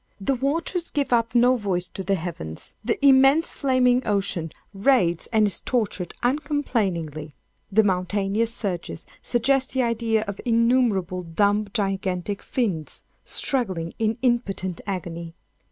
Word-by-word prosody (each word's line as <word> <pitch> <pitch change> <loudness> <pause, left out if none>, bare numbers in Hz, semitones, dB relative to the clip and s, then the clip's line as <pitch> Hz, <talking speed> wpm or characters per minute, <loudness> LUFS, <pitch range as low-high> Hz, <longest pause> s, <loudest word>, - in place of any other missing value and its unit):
The 200 +8 0
waters 320 +7 -1
give 285 -4 -1
up 230 0 +1
no 245 +2 +5
voice 190 -6 -2
to 190 - -6
the 195 +2 +1
heavens. 160 - -6
The - - 0
immense 270 +4 +5
flaming 255 -2 +3
ocean 195 -6 -1 0.2
writhes 195 -6 +2
and 220 -2 +4
is 200 -4 0
tortured 210 -7 -2
uncomplainingly. 205 - -1 0.4
The 220 +3 +5
mountainous 200 +3 0
surges 185 -8 -4 0.2
suggest 260 +2 +1
the 260 -1 +2
idea 230 -2 +1
of 200 -2 -6
innumerable 230 -6 +2
dumb 205 +5 +1
gigantic 195 -2 -2
fiends 190 - -2 0.2
struggling 185 -11 -1
in 220 0 +1
impotent 200 -8 0
agony. 170 -3 -5
210 Hz, 125 wpm, -24 LUFS, 185-250 Hz, 0.4 s, no